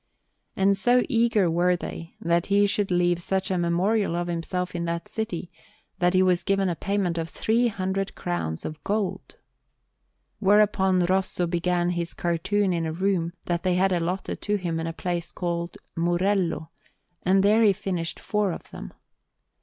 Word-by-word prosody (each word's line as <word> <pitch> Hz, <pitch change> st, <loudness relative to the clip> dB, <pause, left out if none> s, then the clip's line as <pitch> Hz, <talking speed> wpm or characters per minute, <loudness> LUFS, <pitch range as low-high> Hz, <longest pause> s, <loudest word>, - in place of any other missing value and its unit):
And 195 Hz, +1 st, +3 dB
so 245 Hz, +6 st, +3 dB
eager 230 Hz, -6 st, +3 dB
were 175 Hz, +2 st, +2 dB
they 165 Hz, -1 st, -7 dB
that 170 Hz, +1 st, +1 dB
he 205 Hz, 0 st, +4 dB
should 205 Hz, 0 st, 0 dB
leave 175 Hz, -1 st, +2 dB
such 190 Hz, +2 st, -1 dB
a 185 Hz, -, +1 dB
memorial 180 Hz, +3 st, +1 dB
of 175 Hz, 0 st, -1 dB
himself 180 Hz, +2 st, -3 dB
in 170 Hz, -1 st, -2 dB
that 170 Hz, 0 st, -3 dB
city, 200 Hz, -6 st, -4 dB, 0.5 s
that 180 Hz, 0 st, +2 dB
he 185 Hz, -, +5 dB
was 180 Hz, -1 st, +3 dB
given 195 Hz, -1 st, +1 dB
a 175 Hz, -, -1 dB
payment 195 Hz, -3 st, -1 dB
of 165 Hz, 0 st, -3 dB
three 230 Hz, +7 st, +1 dB
hundred 195 Hz, -2 st, -2 dB
crowns 125 Hz, -, -3 dB
of 155 Hz, -2 st, -6 dB
gold. 205 Hz, -1 st, -2 dB, 1.0 s
Whereupon 195 Hz, -2 st, +4 dB
Rosso 185 Hz, 0 st, +1 dB
began 175 Hz, +1 st, 0 dB
his 170 Hz, -1 st, -3 dB
cartoons 185 Hz, +3 st, 0 dB
in 165 Hz, -1 st, -1 dB
a -, -, -2 dB
room 175 Hz, -1 st, 0 dB
that 175 Hz, -1 st, -1 dB
they 180 Hz, 0 st, +1 dB
had 190 Hz, +1 st, +3 dB
allotted 180 Hz, +2 st, -2 dB
to 210 Hz, -, 0 dB
him 175 Hz, -4 st, -2 dB
in 165 Hz, -, -3 dB
a -, -, -2 dB
place 175 Hz, 0 st, -3 dB
called 170 Hz, -1 st, -3 dB, 0.2 s
Murello; 175 Hz, -1 st, 0 dB, 0.5 s
and 190 Hz, +1 st, +3 dB
there 210 Hz, +3 st, +5 dB
he 215 Hz, -3 st, +6 dB
finished 180 Hz, -4 st, -3 dB
four 210 Hz, -2 st, 0 dB
of -, -, -10 dB
them. -, -, -9 dB
180 Hz, 170 wpm, -25 LUFS, 170-195 Hz, 1.0 s, he